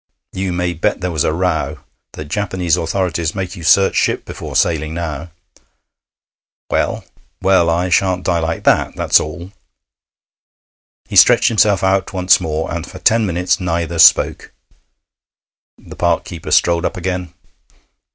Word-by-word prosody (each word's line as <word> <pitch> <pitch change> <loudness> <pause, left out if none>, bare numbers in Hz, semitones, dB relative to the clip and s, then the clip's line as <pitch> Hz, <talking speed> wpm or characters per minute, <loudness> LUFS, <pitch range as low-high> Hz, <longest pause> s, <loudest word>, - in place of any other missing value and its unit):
You 95 -1 -3
may 90 0 -2
bet 80 - -1
there 90 0 -2
was 80 -3 -1
a - - 0
row. 90 +3 -2 0.3
The 75 - -8
Japanese 90 0 -1
authorities 85 -1 -2
make 95 -2 -4
you 85 - -10
search 95 +4 +3
ship - - 0
before - - -8
sailing, 80 -1 0
now.' 85 -1 -5 1.4
'Well?' - - -1 0.3
'Well, 95 -3 +3
I 90 +2 0
shan't 90 +1 +1
die 85 -2 0
like 80 0 -3
that. - - +2
That's - - +3
all.' 85 +5 -7 1.6
He - - -7
stretched - - +6
himself 105 -4 +2
out 95 -1 0
once 90 -1 +3
more, 80 0 -3
and 85 0 -5
for - - -10
ten 110 +3 +2
minutes 90 +2 0
neither 85 -2 -3
spoke. 80 - +4 1.3
The - - -13
park - - 0
keeper 85 - -9
strolled 85 0 +2
up 100 - -3
again. 90 -1 -4
90 Hz, 145 wpm, -17 LUFS, 80-95 Hz, 1.6 s, stretched